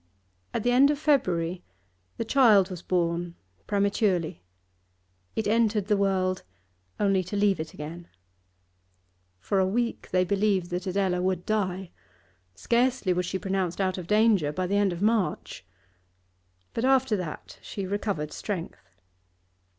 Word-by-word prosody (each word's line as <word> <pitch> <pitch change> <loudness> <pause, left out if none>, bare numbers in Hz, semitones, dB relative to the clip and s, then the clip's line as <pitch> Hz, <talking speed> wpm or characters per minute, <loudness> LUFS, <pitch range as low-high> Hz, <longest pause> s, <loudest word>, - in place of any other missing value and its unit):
At - - -2
the 245 - +2
end 265 +3 +6
of 295 - +1
February 180 - +1 0.5
the - - -2
child 215 -7 +5
was 180 -2 -6
born 170 -1 -1 0.3
prematurely; 200 - 0 0.9
it 220 - -1
entered 215 -2 +2
the 210 0 +2
world 190 -2 +1 0.6
only 195 -2 +2
to 185 - -5
leave 200 -2 +2
it 160 0 -6
again. 165 +3 -8 1.3
For 190 - 0
a 190 - +3
week 235 +4 -2
they 185 0 +2
believed 195 -2 +1
that 180 +2 -3
Adela 185 -1 0
would 185 -1 -1
die. 190 -4 -1 0.6
Scarcely 235 - +1
was 180 0 -1
she 190 - -2
pronounced 190 -2 -2
out 185 -1 0
of 175 - -8
danger 210 -7 +3
by 185 +5 -2
the 195 +3 -1
end 205 -2 +2
of 175 +2 -4
March. 215 -3 -1 1.1
But 230 - -2
after 265 -3 +3
that 175 -5 -7
she 200 - -5
recovered 195 -6 -3
strength. 170 - -6
195 Hz, 140 wpm, -27 LUFS, 180-210 Hz, 1.3 s, end